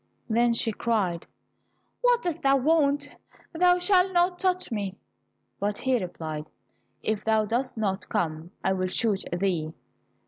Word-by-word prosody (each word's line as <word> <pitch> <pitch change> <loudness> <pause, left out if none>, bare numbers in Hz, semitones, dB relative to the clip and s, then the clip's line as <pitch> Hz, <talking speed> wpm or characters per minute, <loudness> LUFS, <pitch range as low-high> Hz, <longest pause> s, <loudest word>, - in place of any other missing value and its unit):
Then 235 +1 +3
she 230 -1 +1
cried, 200 -7 -1 0.7
"What - - +3
dost 345 -4 -2
thou 275 0 +4
want? 290 0 +2 0.4
Thou 355 +2 +4
shalt 365 +1 +3
not 355 +1 +2
touch 365 -4 0
me." 200 -3 -3 0.6
But 205 0 -1
he 260 -2 +1
replied, 155 -4 -5 0.6
"If 215 -1 -1
thou 220 -1 +2
dost 240 +4 -2
not 200 -3 -2
come, 165 -5 -2
I 190 - +2
will 185 -1 -1
shoot 200 +1 0
thee." 175 -3 -1
225 Hz, 140 wpm, -27 LUFS, 190-320 Hz, 0.7 s, thou